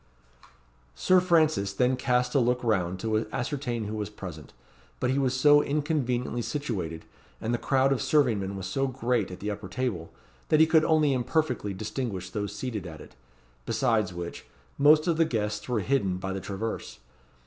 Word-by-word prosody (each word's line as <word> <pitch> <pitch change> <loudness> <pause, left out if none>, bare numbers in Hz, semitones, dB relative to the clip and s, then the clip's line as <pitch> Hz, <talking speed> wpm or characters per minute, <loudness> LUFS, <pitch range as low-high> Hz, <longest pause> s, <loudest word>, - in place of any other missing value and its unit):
Sir 185 - +4
Francis 155 - +2
then 125 +5 +2
cast 125 -1 0
a 140 - +4
look 125 0 +1
round 95 -5 0
to 110 0 0
ascertain 125 -3 -2
who 105 +1 -5
were 105 -1 -3
present; 90 -7 -9 0.5
but 125 - +1
he 135 - +1
was 130 -1 0
so 145 +1 +6
inconveniently 140 -5 -1
situated, 100 - -4 0.3
and 115 +2 -2
the 120 - 0
crowd 135 +3 +2
of 130 - -2
serving 125 -9 +3
men 100 0 -4
was 95 - -5
so 135 +9 0
great 125 -4 -1
at 90 - -9
the 105 +1 -2
upper 100 -1 -6
table, 100 -6 -3 0.4
that 155 - +4
he 160 - +8
could 160 0 +4
only 155 -3 +3
imperfectly 125 -4 0
distinguish 100 -3 -4
those 105 -1 -4
seated 105 -4 -4
at 80 -2 -9
it; - - -14 0.5
besides 115 -7 +1
which, 85 -1 -7 0.3
most 150 +2 +6
of 170 -3 +1
the 165 - +5
guests 105 -6 -2
were 120 -4 +1
hidden 100 -6 0
by 95 +1 -4
the 95 - -4
traverse. 100 +4 -5
120 Hz, 180 wpm, -27 LUFS, 100-135 Hz, 0.5 s, he